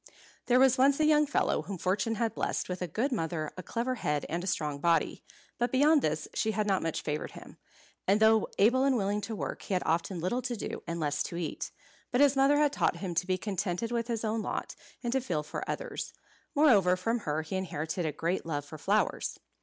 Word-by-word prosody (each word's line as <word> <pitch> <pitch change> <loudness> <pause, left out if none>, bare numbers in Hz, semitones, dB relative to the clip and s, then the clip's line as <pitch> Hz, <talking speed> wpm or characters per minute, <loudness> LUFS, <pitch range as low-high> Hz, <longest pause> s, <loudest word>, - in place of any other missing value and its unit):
There 250 0 +5
was 265 -1 +5
once 275 +2 +5
a 310 - +4
young 300 -1 +4
fellow 290 - +1
whom 195 - -6
fortune 195 +6 0
had 225 0 0
blessed - - -2
with 180 0 -4
a 180 - -1
good 235 - -1
mother, 160 -8 -2
a 185 - -6
clever 235 +8 -2
head, 150 -1 0
and 170 +2 -2
a - - -5
strong 150 -6 -1
body. 170 +1 +1 0.4
But 240 +1 +1
beyond 290 +3 +5
this 155 -5 -1
she 220 - 0
had 210 0 0
not 195 -2 +1
much 165 -1 -2
favoured 150 0 -3
him; - - -12 0.5
and 200 +3 +4
though 220 0 +5
able 245 +6 +4
and 270 -2 +3
willing 205 0 0
to 220 +1 -4
work, - - -4
he 195 - -2
had 180 - 0
often 170 +3 0
little 185 +9 -1
to 245 -1 -2
do, 210 - -5
and 170 0 -3
less 145 -2 0
to - - -3
eat. 170 -3 -3 0.4
But 250 - +1
his 285 -1 +5
mother 275 +2 +4
had 295 -1 +3
taught - - +1
him 185 -3 -4
to 180 +2 0
be 185 -1 +1
contented 195 +2 -2
with 235 -1 -1
his 230 -2 -2
own 220 +1 0
lot, - - -4 0.3
and 240 0 -1
to 265 - +2
feel 170 -12 -2
for 150 - -5
others. - - -4 0.4
Moreover, 205 - +5
from 225 +6 0
her 155 -5 -2
he 160 +4 -5
inherited 170 -2 -2
a - - 0
great 170 +5 -1
love 145 -3 -3
for 155 +1 -10
flowers. 205 +7 0
200 Hz, 230 wpm, -30 LUFS, 170-245 Hz, 0.5 s, There